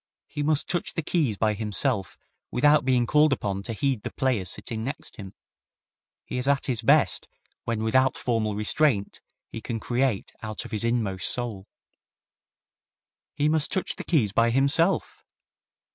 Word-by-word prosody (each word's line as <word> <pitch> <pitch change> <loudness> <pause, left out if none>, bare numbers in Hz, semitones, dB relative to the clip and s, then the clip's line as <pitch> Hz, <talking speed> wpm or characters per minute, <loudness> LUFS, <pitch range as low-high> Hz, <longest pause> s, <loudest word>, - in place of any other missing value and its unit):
He 150 - -6
must 150 0 +1
touch 175 -1 -2
the 165 - -2
keys 145 - 0
by 110 0 +1
himself 105 -1 -1 0.3
without 145 +4 +4
being 125 -2 +2
called 150 +4 +4
upon 100 -6 -1
to 115 +3 -4
heed 130 0 -1
the - - -5
players 120 -9 0
sitting 110 -1 -4
next 140 +5 -6
him. 95 -3 -8 0.9
He 125 - -4
is 125 - +1
at 140 -1 +2
his 120 -4 -1
best 115 - +3 0.4
when 115 -2 -2
without 130 +4 +2
formal 110 -4 -1
restraint, 105 0 +1 0.3
he 115 - -6
can 115 -1 -4
create 120 -2 -1
out 110 -1 -5
of - - -10
his 110 0 -1
inmost 110 -6 0
soul." 110 -6 -4 1.7
"He 145 - +1
must 155 -1 +2
touch 190 - -1
the - - -7
keys 130 - +1
by 115 +1 +3
himself!" 140 +9 +1
120 Hz, 160 wpm, -26 LUFS, 110-140 Hz, 1.7 s, without